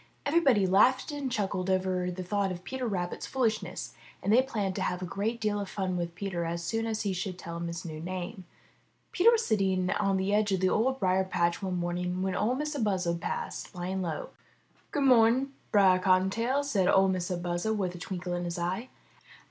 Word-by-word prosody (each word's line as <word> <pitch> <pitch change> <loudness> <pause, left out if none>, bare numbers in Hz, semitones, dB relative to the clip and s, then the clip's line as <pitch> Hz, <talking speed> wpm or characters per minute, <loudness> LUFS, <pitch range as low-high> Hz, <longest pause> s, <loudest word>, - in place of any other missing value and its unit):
Every 315 +4 +4
body 245 - +4
laughed 225 - +4
and 285 -3 -3
chuckled 195 -4 -1
over 185 -1 +1
the 180 +1 -5
thought 200 +1 0
of 180 0 -6
Peter 260 +2 -3
Rabbit's 180 -4 -3
foolishness, 235 -5 -1 0.3
and 205 - +2
they 250 - +7
planned 210 -8 -2
to - - -2
have 180 0 -1
a - - -2
great 210 +6 -2
deal 210 -2 0
of 200 -2 -4
fun 190 -2 -2
with 170 -1 -3
Peter 180 -2 -3
as 170 +1 -3
soon 225 +5 -1
as 220 -1 -2
he 200 -2 0
should 185 0 -4
tell 170 -1 -6
them 170 - -3
his 170 +1 -5
new 155 -2 -6
name. 185 +4 -5 0.7
Peter 380 +6 +5
was 465 -1 +2
sitting 190 -4 +1
on 195 -1 +1
the 190 +2 0
edge 210 0 +2
of 190 - +1
the 185 0 +3
Old 260 +6 +1
Briar 190 0 +2
patch 175 -2 0
one 185 -2 -2
morning 180 +1 -2
when 190 -1 -1
Or 240 +4 +1
Mistah 300 +1 -3
Buzzard 180 -5 0
passed, - - -4
flying 185 +2 -4
low. 165 -4 -3 0.6
*'Good 290 - -1
mo'ning. 255 +1 +4 0.2
Brer 190 -3 +5
Cottontail, 195 +9 +2
said 200 -10 +1
or 195 0 +5
Mistah 185 -1 -1
Buzzard, 175 +5 -1
with 185 -3 -1
a 175 - -9
twinkle 180 -1 -4
in 175 0 -2
his 170 0 -3
eye. 185 +8 -2
190 Hz, 210 wpm, -29 LUFS, 180-220 Hz, 0.7 s, they